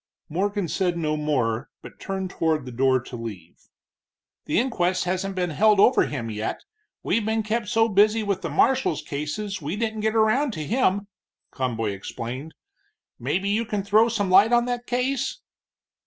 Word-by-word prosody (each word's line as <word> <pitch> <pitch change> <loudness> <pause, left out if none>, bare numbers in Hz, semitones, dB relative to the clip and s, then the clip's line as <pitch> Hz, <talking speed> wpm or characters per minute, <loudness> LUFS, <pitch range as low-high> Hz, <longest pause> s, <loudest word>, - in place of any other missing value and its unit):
Morgan 200 +3 -1
said 175 +1 0
no 155 -2 0
more, 135 -5 -1
but - - -12
turned 190 -1 -4
toward 155 -4 0
the 125 - -7
door 130 +1 +2
to 120 - -9
leave. 105 -8 -9 0.8
"The - - 0
inquest 185 -8 0
hasn't 185 +2 -2
been 180 -2 -1
held 210 +5 +4
over 245 - +5
him 115 -6 -4
yet, 110 +1 -4 0.4
we've 230 - +1
been 220 +1 0
kept 215 +1 -1
so 225 +2 +3
busy 215 +1 +3
with 200 -2 -1
the 165 - -3
marshal's 235 - +2
cases 175 +8 -4
we 155 +5 -3
didn't 220 0 -2
get 220 +1 0
around 225 +5 +3
to 155 -4 -4
him," 205 - +1 0.5
Conboy 115 -5 -2
explained. 120 +9 -6 0.6
"Maybe 195 +2 -1
you 215 +3 +1
can 210 -3 -3
throw 215 +3 +4
some 205 -5 -1
light 200 +5 +6
on 240 0 +4
that 245 0 -3
case?" 260 - -1
195 Hz, 170 wpm, -24 LUFS, 150-220 Hz, 0.8 s, light